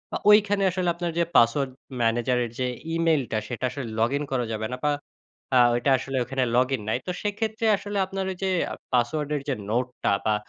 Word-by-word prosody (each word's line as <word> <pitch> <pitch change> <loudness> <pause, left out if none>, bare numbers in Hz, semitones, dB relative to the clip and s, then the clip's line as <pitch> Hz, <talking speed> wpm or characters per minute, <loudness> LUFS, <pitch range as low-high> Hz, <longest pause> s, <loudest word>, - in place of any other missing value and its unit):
আ - - +1
ওইখানে 205 -1 +5
আসলে 180 -1 0
আপনার 170 -1 -2
যে 170 - +4
পাসওয়ার্ড 130 +3 +4 0.3
ম্যানেজারের 120 +1 +1
যে 125 - +1 0.3
ইমেইলটা 160 -9 +1
সেটা 125 0 -3
আসলে 130 -2 -5
লগইন 140 +6 +1
করা 125 -2 0
যাবে 110 0 -2
না। 125 - -3
বা 150 - +3 0.7
আ - - +7
ঐটা 120 +3 +1
আসলে 135 +1 -4
ওইখানে 130 +1 -1
লগইন 130 -2 +2
নাই। 110 - +1
তো 180 - 0
সেক্ষেত্রে 220 +2 -2
আসলে 205 +1 -5
আপনার 195 0 -4
ওই - - -5
যে 190 - +1 0.2
আ - - -3 0.2
পাসওয়ার্ডের 145 +4 0
যে - - +2 0.2
নোটটা 125 +1 -1
বা 105 -1 +3
135 Hz, 190 wpm, -25 LUFS, 120-175 Hz, 0.7 s, আ